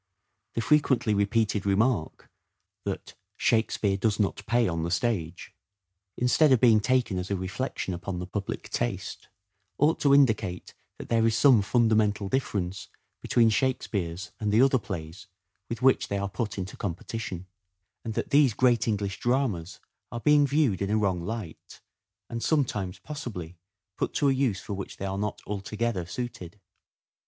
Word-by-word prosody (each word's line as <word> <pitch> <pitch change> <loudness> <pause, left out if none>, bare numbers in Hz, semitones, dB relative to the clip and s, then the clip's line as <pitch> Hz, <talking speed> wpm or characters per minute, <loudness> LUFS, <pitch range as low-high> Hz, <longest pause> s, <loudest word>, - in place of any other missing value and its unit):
The 115 - 0
frequently 130 -5 +2
repeated 105 0 +1
remark 100 -3 0 0.6
that - - -4
" - - -57
Shakespeare 110 -3 +1
does 105 +1 0
not 105 0 0
pay 120 +1 +3
on 85 -2 -2
the 85 - -2
stage," 90 -4 -2 0.6
instead 135 +4 +4
of 130 - +5
being 115 -3 +6
taken 120 -4 +1
as 90 - -5
a 100 - 0
reflection 95 +2 -3
upon 90 +1 -5
the 90 - -4
public 100 +2 -5
taste, - - -3 0.5
ought 150 +3 +3
to 140 -1 +5
indicate 110 -10 +2 0.2
that - - -9
there 115 -1 +3
is 110 - +1
some 130 -7 +6
fundamental 105 -2 +2
difference 95 -7 -2 0.3
between 115 -2 +3
Shakespeare's 95 -7 -1
and 105 -1 -1
the 110 +5 +5
other 135 -1 +4
plays 95 -1 -7 0.4
with 115 +2 -5
which 130 0 +4
they 100 - -2
are 100 0 -1
put 105 +2 -4
into 95 0 -5
competition; 95 0 -5 0.6
and 110 -1 -5
that - - -3
these 140 -6 +5
great 120 -3 +3
English 100 -2 -1
dramas 120 -10 -1 0.3
are 120 - -4
being 145 +2 +4
viewed 140 -9 +1
in 100 - -1
a 105 - +2
wrong 95 -5 0
light, 105 -4 -7 0.5
and 115 0 -5
sometimes, 110 - 0
possibly, 110 - -7 0.4
put - - -2
to 140 - +3
a - - +3
use 130 -8 0
for - - -6
which 100 0 -6
they 100 - -5
are 95 0 -3
not 105 0 -3
altogether 105 -1 -3
suited. 105 -3 -6
105 Hz, 160 wpm, -27 LUFS, 95-120 Hz, 0.6 s, being